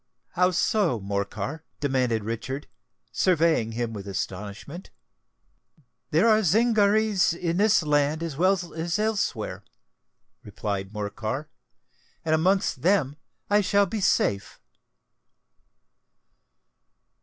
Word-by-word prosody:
"How 180 Hz, +1 st, +2 dB
so, 180 Hz, -, +1 dB
Morcar?" 100 Hz, +8 st, -4 dB, 0.2 s
demanded 125 Hz, -6 st, 0 dB
Richard, 120 Hz, +6 st, -4 dB, 0.5 s
surveying 165 Hz, -10 st, +2 dB
him 115 Hz, 0 st, -3 dB
with 100 Hz, -2 st, -7 dB
astonishment. 100 Hz, -, -6 dB, 1.2 s
"There -, -, +3 dB
are 220 Hz, -1 st, +5 dB
Zingarees 210 Hz, -1 st, +3 dB
in 170 Hz, 0 st, -2 dB
this 210 Hz, -2 st, +4 dB
land 150 Hz, +1 st, +1 dB
as 165 Hz, -4 st, -4 dB
well 180 Hz, +1 st, +1 dB
as 165 Hz, +3 st, -2 dB
elsewhere," 215 Hz, -1 st, -2 dB, 0.8 s
replied 100 Hz, -2 st, -4 dB
Morcar; 110 Hz, +7 st, -4 dB, 0.8 s
"and 160 Hz, -, +1 dB
amongst 170 Hz, -4 st, +1 dB
them 165 Hz, -6 st, +2 dB, 0.3 s
I 205 Hz, +1 st, +3 dB
shall 200 Hz, +1 st, +3 dB
be 210 Hz, +3 st, -4 dB
safe." 100 Hz, -, 0 dB
160 Hz, 100 wpm, -25 LUFS, -, 1.2 s, are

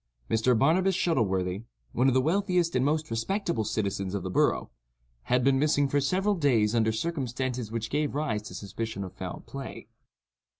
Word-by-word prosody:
Mr. 115 Hz, +2 st, +3 dB
Barnabas 180 Hz, +9 st, +3 dB
Shuttleworthy—one 110 Hz, -, -1 dB
of 130 Hz, -, +3 dB
the 130 Hz, -, +5 dB
wealthiest 180 Hz, +1 st, +1 dB
and 125 Hz, -, +3 dB
most 155 Hz, 0 st, 0 dB
respectable 170 Hz, -, -1 dB
citizens 100 Hz, -3 st, -2 dB
of 100 Hz, -, -3 dB
the 95 Hz, -, -4 dB
borough—had -, -, -1 dB
been 135 Hz, 0 st, +3 dB
missing 145 Hz, -1 st, +3 dB
for 145 Hz, +1 st, +1 dB
several 190 Hz, +9 st, +1 dB
days 125 Hz, -, +2 dB
under 110 Hz, -1 st, +2 dB
circumstances 130 Hz, -3 st, -3 dB
which 115 Hz, -1 st, -3 dB
gave 145 Hz, -1 st, 0 dB
rise 145 Hz, -8 st, -1 dB
to 105 Hz, -, -9 dB
suspicion 110 Hz, 0 st, -5 dB
of 95 Hz, -1 st, -8 dB
foul 95 Hz, -1 st, -6 dB
play. 135 Hz, -1 st, -8 dB
125 Hz, 160 wpm, -28 LUFS, 105-150 Hz, -, the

